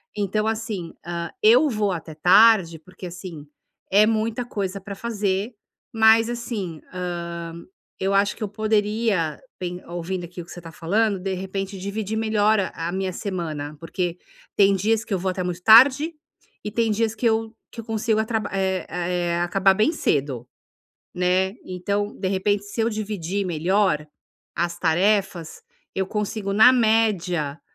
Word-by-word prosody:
Então, 210 +1 -1
assim, 220 -6 -3
hã, 170 -1 -4
eu 245 +8 +6
vou 210 -4 0
até 165 -3 -5
tarde, 180 0 +5
porque, 185 +3 -11
assim, 170 -4 -9 0.4
é 205 +2 +6
muita 225 +2 -1
coisa 200 -4 -4
pra 200 +1 -7
fazer, 205 0 -2 0.4
mas, 225 0 +5
assim, 225 -9 -4
hã, 170 -2 -5 0.5
eu 195 +1 0
acho 200 +1 +2
que 225 - -6
eu - - -1
poderia 210 -5 0 0.2
pen 180 0 -5
ouvindo 175 +1 -4
aqui 175 +1 -9
o - - -11
que 175 - -14
você 175 - -9
tá 165 -1 -10
falando, 200 +5 0
de 190 +1 -3
repente, 195 +1 -4
dividir 205 +2 -3
melhor 215 -1 +2
a 170 -3 -3
a - - -3
minha 190 0 -2
semana, 160 -7 -4
porque 175 +1 -3 0.4
tem 200 -1 +5
dias 215 +3 +1
que 215 - -5
eu 190 - 0
vou 185 +1 -1
até 185 0 -3
muito 180 0 -4
tarde 265 - +7 0.5
e 210 - -4
tem 230 0 +1
dias 220 +1 0
que 230 - -4
eu 225 0 0 0.2
que 230 - -7
eu - - -16
consigo 220 -1 0
atra 220 0 0
é 190 -2 -1
a 180 - -6
é 175 -1 0
acabar 190 +2 +3
bem 215 +10 +2
cedo, 135 - -1 0.7
né, 180 +1 +2
então, 200 +3 -3
de 190 - -1
repente, 200 +1 0
se 205 +3 -5
eu 225 - +2
dividir 200 -3 -3
melhor 175 -1 +1 0.5
as 170 0 -1
tarefas, 185 0 0 0.3
eu 190 - 0
consigo, 210 0 -3
na 220 +5 +7
média, 195 - +1
195 Hz, 165 wpm, -23 LUFS, 175-220 Hz, 0.7 s, tarde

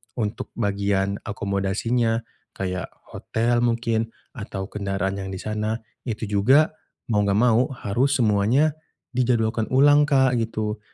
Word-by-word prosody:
untuk 115 +1 -3
bagian 100 -1 0
akomodasinya, 105 +4 0 0.3
kayak 90 -1 -3 0.2
hotel 120 +1 0
mungkin 115 -1 0 0.2
atau 100 -3 -6
kendaraan 100 -1 -2
yang 95 0 -5
di - - -6
sana, 110 0 -2 0.3
itu 115 -1 -3
juga 130 +10 +4 0.4
mau 105 - +3
enggak 100 - +2
mau 125 +1 +4
harus 125 +6 0
semuanya 115 +6 +3 0.4
dijadwalkan 115 -3 +1
ulang, 145 +2 +5
Kak, 130 -3 +4
gitu. 110 -1 -2
110 Hz, 120 wpm, -23 LUFS, 100-120 Hz, 0.4 s, ulang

